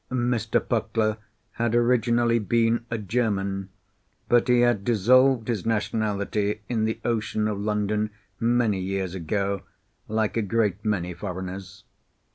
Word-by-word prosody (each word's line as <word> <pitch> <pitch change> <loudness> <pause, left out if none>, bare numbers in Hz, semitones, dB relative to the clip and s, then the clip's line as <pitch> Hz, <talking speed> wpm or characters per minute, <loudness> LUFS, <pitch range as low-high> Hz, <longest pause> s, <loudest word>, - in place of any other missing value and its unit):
Mr. 120 -3 +1
Puckler 110 -1 0 0.3
had 115 0 -1
originally 120 -1 +3
been 115 +2 +1
a 115 - -2
German, 100 -3 -1 0.6
but 120 0 +3
he 125 -1 +4
had 120 -5 +2
dissolved 120 +2 +4
his 115 -6 -1
nationality 105 -1 -1
in 110 -3 0
the 110 0 -2
ocean 110 -2 0
of 105 -2 -2
London 105 0 0 0.3
many 115 -4 +2
years 95 -1 -2
ago, 100 +2 -2 0.5
like 110 0 0
a 115 - +2
great 105 -1 0
many 90 -5 -1
foreigners. 95 +2 -7
110 Hz, 125 wpm, -25 LUFS, 100-115 Hz, 0.6 s, he